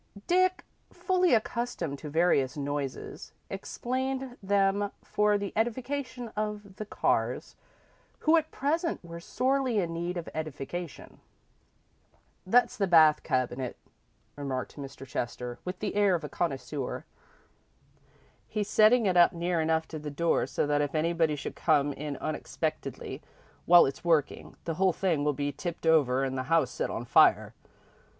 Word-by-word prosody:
Dick, 370 +1 +2 0.3
fully 365 -6 +2
accustomed 215 - -2
to 150 - -7
various 145 -4 +2
noises, 145 -1 -4 0.2
explained 260 +1 -3
them 200 +1 +1
for 210 0 +2
the 200 -1 -5
edification 250 +2 -2
of 210 -2 -5
the 215 - -6
Carrs, - - 0 0.7
who 320 +1 +5
at 315 -1 +1
present 325 +5 -1
were 170 0 -8
sorely 260 +5 0
in 170 -4 0
need 175 +2 -3
of 170 - -5
edification. 155 +1 -6 1.3
"That's 240 +4 +3
the 200 -2 +1
bath 160 -3 +6
cabinet," 130 0 -2 0.6
remarked 135 -3 -4
Mr. 135 -2 -8
Chester, 120 -1 -4
with 180 0 -5
the 210 0 -3
air 205 -2 +3
of 165 - -4
a 150 - -5
connoisseur. 140 -4 -3 1.4
"He's 210 -2 -2
setting 220 +2 +5
it 185 -2 +2
up 175 +2 +6
near 170 0 0
enough 160 0 +1
to 155 - -6
the 150 0 -5
door 165 +3 +1
so - - -1
that 145 0 +1
if 145 +1 -2
anybody 165 -1 +1
should 145 - -6
come 145 -3 +2
in 145 0 -5
unexpectedly 155 -1 -4 0.5
while 175 0 +8
it's 135 - -4
working, 160 -4 0
the 165 - -2
whole 190 -2 +4
thing 165 -6 0
will 150 0 +2
be 145 +1 -2
tipped 170 +4 -6
over 140 -5 +4
and 130 -1 -2
the - - -1
house 165 0 +3
set - - -2
on - - -4
fire. - - +4
170 Hz, 145 wpm, -29 LUFS, 145-215 Hz, 1.4 s, while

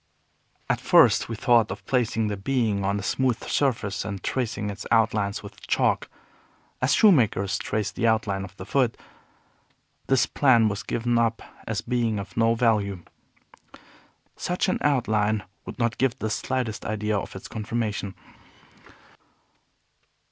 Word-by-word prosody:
At - - 0
first - - +5
we 115 - -3
thought 120 -2 +3
of 100 0 -7
placing 115 -4 0
the 105 -1 -2
being 105 -1 0
on 100 +1 0
a - - -6
smooth 125 +1 0
surface 110 -9 0
and 100 -2 -6
tracing 110 -5 -2
its 100 0 -8
outlines 110 -3 +1
with - - -12
chalk, - - +1 0.7
as 130 - +3
shoemakers 115 - +3
trace 105 -1 -2
the 115 - 0
outline 110 -4 +1
of 95 +1 -11
the - - -8
foot. 130 -5 +1 1.1
This 135 -2 +3
plan 120 -6 +4
was 105 -1 -3
given 120 0 0
up 115 -1 0 0.2
as - - -2
being 120 -3 0
of 95 -2 -7
no 115 0 +3
value. 105 -6 +1 1.3
Such 180 +2 -1
an 185 - 0
outline 110 -6 +1 0.2
would - - -7 0.2
give 130 -2 +2
not - - -36
the 110 - -2
slightest 125 -4 -2
idea 105 0 -1
of 100 - -4
its 95 - -8
conformation. 110 -3 -3
110 Hz, 140 wpm, -25 LUFS, 100-120 Hz, 1.3 s, first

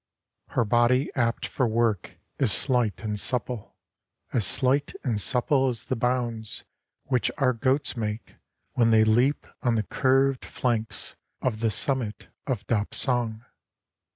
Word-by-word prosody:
Her 120 - +4
body 120 +5 +3
apt 120 -3 0
for 130 - 0
work 110 -3 0 0.2
is 130 -6 +3
slight 125 -2 +1
and 105 -1 -2
supple. 125 -1 -2 0.6
As 110 -7 +3
slight 135 +3 +1
and 115 -6 0
supple 135 +2 +2
as 120 -2 -4
the 130 - -1
bounds 120 -3 -2 0.4
Which 125 -2 0
our 130 -2 +2
goats 130 +5 0
make, 110 -1 -4 0.4
when 115 -2 +3
they 110 -1 +5
leap 120 +6 +2 0.2
On 120 -2 +1
the 110 - +1
curved 135 +4 +2
flanks 115 -3 -2 0.2
of 115 -4 -1
the 115 0 +1
summit 120 -1 -1 0.2
of 120 -6 -2
Dapsang. 115 +1 0
120 Hz, 135 wpm, -26 LUFS, 110-130 Hz, 0.6 s, they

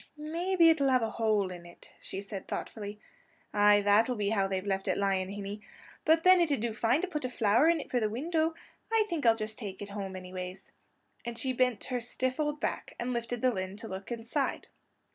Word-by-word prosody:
"Maybe 335 +3 +3
it'll 285 -4 +3
have 255 -2 +3
a 220 - -1
hole 215 -5 +1
in 175 -1 -8
it," 175 0 -15
she 195 - -5
said 200 -1 -7
thoughtfully: 210 -1 -5 0.5
"Ay, 205 0 +6
that'll 210 +5 +4
be 205 -2 0
how 200 -3 +2
they've 190 0 -2
left 195 -1 -1
it - - +1
lying, 195 -2 +1
hinny. 200 +1 -6 0.4
But 325 +1 +4
then 370 -1 +7
it 335 - +2
'd 280 - +1
do 230 0 -2
fine 235 +6 +2
to - - 0
put 300 -6 -4
a 255 - -1
flower 230 +6 +3
in 330 -3 +1
for 250 - 0
the 215 -2 0
window; 320 +7 0 0.4
I'm 445 -1 +4
thinking 330 - +2
I'll 225 - +5
just 215 -1 -5
take 200 -5 -6
it 205 - -7
home, 200 -2 -5
anyways." 185 0 -7 0.5
And 235 -1 -5
she 260 +2 -1
bent 250 -3 +1
her 250 -2 -2
stiff 255 +3 -2
old 295 -1 0
back, - - -3
and 250 +1 -2
lifted 235 0 -3
the 255 -1 +4
lid 190 0 -4
to 225 - -7
look 190 +3 -7
inside. 230 0 -2
225 Hz, 220 wpm, -30 LUFS, 200-270 Hz, 0.5 s, then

